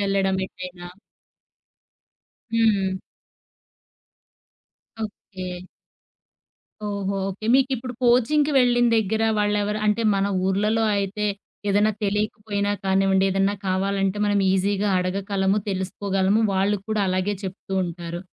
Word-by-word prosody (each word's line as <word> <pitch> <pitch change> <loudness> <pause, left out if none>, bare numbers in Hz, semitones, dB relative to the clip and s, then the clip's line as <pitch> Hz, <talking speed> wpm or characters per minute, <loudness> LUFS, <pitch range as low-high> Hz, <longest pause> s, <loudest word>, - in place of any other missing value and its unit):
వెళ్ళడం 195 -1 +1
ఎటైనా. 180 -1 -9 1.7
హ్మ్. 200 -4 +2 2.1
ఓకే. 195 -2 -9 1.4
ఓహో! 200 -1 -2
ఓకే. 200 +3 -6
మీకిప్పుడు 260 -2 +1
కోచింగ్‌కి 255 +5 +3
వెళ్ళిన 245 -2 +4
దగ్గర 220 0 0 0.2
వాళ్ళెవరు 210 0 0
అంటే 210 +2 +2
మన 195 0 +1 0.2
ఊర్లలో 210 +4 +1
అయితే 200 +1 -1 0.4
ఏదన్నా 205 +2 +3
తెలియకపోయినా 205 0 -1
కానివ్వండి, 190 0 +3
ఏదన్నా 195 +1 +1
కావాలంటే 195 +1 0
మనం 205 -1 +2
ఈజీగా 200 +2 +1
అడగగలము, 195 +2 0
తెలుసుకోగలము, 195 +1 0
వాళ్ళు 195 +2 +2
కూడా 215 -1 0
అలాగే 185 +2 0
చెప్తూ 190 0 -7
ఉంటారు. 170 0 -6
200 Hz, 95 wpm, -23 LUFS, 190-210 Hz, 2.1 s, వెళ్ళిన